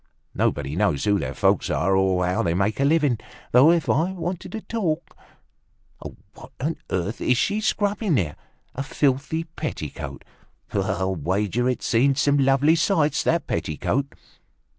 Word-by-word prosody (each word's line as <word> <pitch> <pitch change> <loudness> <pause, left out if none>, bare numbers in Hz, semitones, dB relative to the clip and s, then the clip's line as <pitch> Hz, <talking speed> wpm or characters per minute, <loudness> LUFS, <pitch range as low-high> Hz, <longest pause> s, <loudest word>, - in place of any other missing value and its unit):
Nobody 70 +1 -1
knows 95 -7 +1
who 100 -1 +2
their - - -4
folks - - +2
are 95 +4 +1
or 95 -1 +2
how 90 +1 0
they 85 0 0
make 100 +5 0
a - - +2
living. 145 -5 +2 0.3
Though, 130 +6 +7
if 170 -1 +2
I 170 +6 +1
wanted 175 0 -5
to 220 - -4
talk... 170 -9 -3 1.2
What - - -13
on 150 +5 -2
earth 95 +4 -2
is 125 - +2
she 205 - 0
scrubbing 205 -4 0
there? 85 - -1 0.4
A 130 - -4
filthy 140 +3 0
petticoat. 155 - -6 0.5
I'll 95 +2 0
wager 100 - 0
it's 125 - -2
seen 135 +4 +3
some 145 0 +2
lovely 135 +3 +4
sights, 160 -3 +2
that 170 0 +1
petticoat!" 85 - -1
135 Hz, 150 wpm, -23 LUFS, 95-160 Hz, 1.2 s, Though